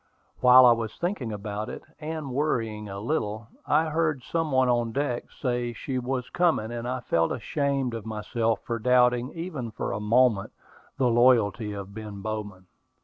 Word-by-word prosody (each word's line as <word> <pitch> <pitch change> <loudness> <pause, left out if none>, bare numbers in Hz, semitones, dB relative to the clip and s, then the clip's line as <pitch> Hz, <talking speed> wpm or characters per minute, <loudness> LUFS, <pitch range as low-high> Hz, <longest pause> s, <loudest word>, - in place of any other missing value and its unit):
While 125 0 +8
I 120 - +8
was 115 -2 -1
thinking 175 - -2
about 105 0 -4
it, - - -7 0.2
and 155 -3 -5
worrying 115 -7 -1
a 100 0 -6
little, 110 -3 -2 0.2
I 155 +2 +3
heard 155 -4 0
some 165 +1 -2
one 130 -1 +3
on 120 -2 +1
deck 135 -2 -2
say 120 -2 -2
she 130 +3 -3
was 125 0 -3
coming; 160 -11 +1
and 120 0 -4
I 125 0 -2
felt 80 -7 +1
ashamed 135 +1 -1
of 115 -2 -5
myself 110 0 -1
for 115 -1 -2
doubting, 125 +1 +3
even 165 -8 -5
for - - -4
a - - -2
moment, 110 -1 +2 0.4
the 130 - +2
loyalty 115 -3 +3
of 100 -1 -7
Ben 105 -2 -7
Bowman. 105 -4 -5
120 Hz, 170 wpm, -26 LUFS, 110-130 Hz, 0.4 s, While